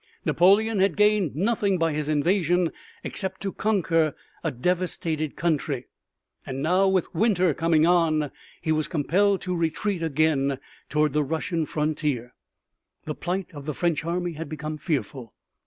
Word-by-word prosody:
Napoleon 200 +5 +4
had 190 -4 +3
gained 210 -8 +3
nothing 200 +1 +1
by 165 -2 +1
his 150 0 -2
invasion 175 +2 +2 0.3
except 190 -2 -3
to 195 -1 -3
conquer 165 -7 +1 0.3
a - - +1
devastated 160 +1 -1
country, 150 -6 -1 0.6
and 135 +1 -5
now, 185 +4 +3
with 190 -2 +1
winter 185 -3 +2
coming 160 0 +3
on, 160 -5 +2 0.3
he 160 - 0
was 155 0 +1
compelled 185 +5 +2
to 180 -1 -2
retreat 170 +3 -1
again 150 -3 +1 0.3
toward 150 0 +1
the 150 0 +2
Russian 160 +2 -2
frontier. 150 -5 -1 0.7
The 155 - -3
plight 180 +3 -3
of 145 -1 -9
the 150 - -2
French 170 -3 0
army 175 +1 -2
had 160 +1 -6
become 155 0 -5
fearful. 135 -6 -3
165 Hz, 145 wpm, -25 LUFS, 150-185 Hz, 0.7 s, Napoleon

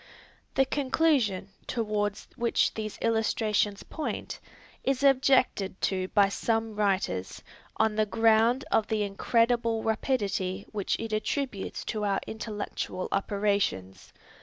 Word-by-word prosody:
The 270 - +4
conclusion, 265 - +1 0.2
toward 210 -3 -1 0.2
which 235 -2 +1
these 215 -1 -5
illustrations 215 -2 +1
point, 315 - -5 0.4
is 270 0 0
objected 260 -8 +3
to 185 -1 0
by 200 0 +4
some 225 +2 -1
writers, 195 - -1 0.3
on 220 -1 +2
the 215 0 +1
ground 225 +4 +3
of 215 - +3
the 215 -1 0
incredible 230 +2 +1
rapidity 205 -5 -1
which 205 -3 -1
it 225 -1 -4
attributes 215 0 -2
to 215 -2 -3
our 200 -1 +1
intellectual 210 -4 -4
operations. 195 - -1
215 Hz, 110 wpm, -28 LUFS, 200-230 Hz, 0.4 s, The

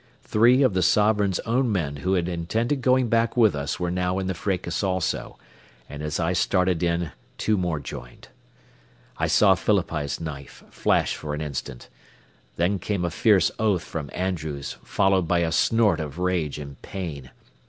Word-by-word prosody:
Three 120 +5 +4
of 130 - +3
the 95 - +1
Sovereign's 105 0 +3
own 120 +1 0
men 75 -8 -1
who 95 +6 -1
had 85 -2 0
intended 110 - -1
going 130 -1 +3
back 115 +1 +1
with 110 -8 +5
us 70 0 -3
were 90 -1 -1
now 90 +1 -1
in 95 - -2
the 95 - -1
fracas 90 0 -2
also, 95 -3 -2 0.5
and 75 0 -8
as 75 +1 -3
I 85 +1 +1
started 90 -1 +1
in 85 -2 0 0.3
two 110 - +1
more 90 -5 -1
joined. - - -10 0.9
I - - +1
saw 100 -3 +5
Phillippi's 85 -7 -1
knife 75 -4 -8
flash - - +1
for 75 -1 -5
an 75 - -5
instant. 70 -4 -5 0.7
Then 90 +4 +1
came 95 -1 -2
a 85 - -2
fierce 100 +2 +3
oath 105 -6 +1
from 80 -6 -6
Andrews, 80 -7 -3
followed 95 -3 +2
by 85 0 +2
a 80 -1 0
snort 105 -3 +3
of 75 -1 -5
rage 90 -5 -1
and 70 -2 -9
pain. 80 -9 -6
90 Hz, 170 wpm, -24 LUFS, 80-100 Hz, 0.9 s, with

